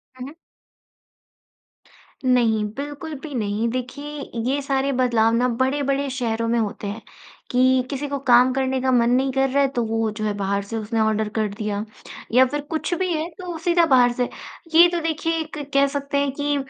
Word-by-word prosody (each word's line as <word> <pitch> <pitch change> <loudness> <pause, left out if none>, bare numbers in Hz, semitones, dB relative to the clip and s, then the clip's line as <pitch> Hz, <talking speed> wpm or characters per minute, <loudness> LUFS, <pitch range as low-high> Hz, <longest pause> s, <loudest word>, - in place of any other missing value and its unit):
हुँ, 255 0 -7
हुँ। 285 - -10 1.9
नहीं, 235 -4 +3
बिल्कुल 290 +3 -6
भी 300 -3 -7
नहीं। 210 0 -1
देखिए, 255 +4 -5 0.4
ये 280 +2 0
सारे 275 0 0
बदलाव 235 -3 +2
ना 245 +2 +2
बड़े-बड़े 275 +3 0
शहरों 230 -3 -2
में 235 - +2
होते 210 -1 -3
हैं 205 +3 -5 0.5
कि, 255 0 +3
किसी 285 +1 -3
को 280 0 -3
काम 245 +1 +6
करने 265 0 0
का 260 0 +1
मन 240 -1 +3
नहीं 265 +2 +2
कर 270 0 +1
रहा 280 +2 +2
है, - - +3
तो 245 -3 -2
वो 225 0 0
जो 215 0 -6
है, 210 - 0
बाहर 200 0 -1
से 225 +3 -5
उसने 225 +1 -2
ऑर्डर 220 -1 +1
कर 215 -1 +1
दिया, 210 -1 -2 0.5
या 255 +3 +6
फिर 290 +3 -3
कुछ 320 +2 -2
भी 365 +1 -1
है, 315 +1 -2
तो 355 0 -7
सीधा 340 0 +3
बाहर 245 -1 +6
से। 245 0 -1 0.5
ये 345 +2 +9
तो 345 - -1
देखिए, 325 +1 -1
एक 310 -1 -8 0.2
कह 280 0 +4
सकते 280 0 -3
हैं 280 -1 +1
कि 290 0 0
260 Hz, 195 wpm, -22 LUFS, 230-285 Hz, 1.9 s, ये